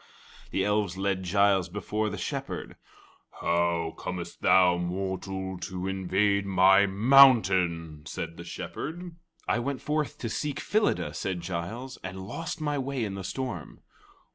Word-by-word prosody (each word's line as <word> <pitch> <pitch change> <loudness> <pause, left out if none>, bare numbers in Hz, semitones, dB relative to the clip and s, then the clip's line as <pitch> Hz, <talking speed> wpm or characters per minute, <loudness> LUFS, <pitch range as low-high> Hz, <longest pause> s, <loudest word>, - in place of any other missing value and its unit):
The 95 - 0
elves 105 -3 0
led 95 -1 0
Giles 95 0 +2
before 105 +3 -2
the - - -5
Shepherd. - - -4 0.6
"How 85 -1 +1
comest 90 -2 -6
thou, 90 -2 +5
mortal, 95 +1 -3
to 90 +1 -4
invade 95 +1 +1
my 95 +1 +5
mountain?" 95 - +5
said 85 0 -5
the 85 - -9
Shepherd. 165 - -6 0.3
"I - - +2
went 135 +2 -2
forth 150 -1 -2
to 120 - -4
seek 145 +6 -3
Phyllida," 210 +1 0
said 95 -3 -3
Giles, 110 +10 -5
"and 95 0 -6
lost 165 - -5
my 145 -2 -1
way 135 -3 -2
in 100 - -4
the 95 -1 -6
storm." 105 - -5
95 Hz, 140 wpm, -28 LUFS, 90-120 Hz, 0.6 s, thou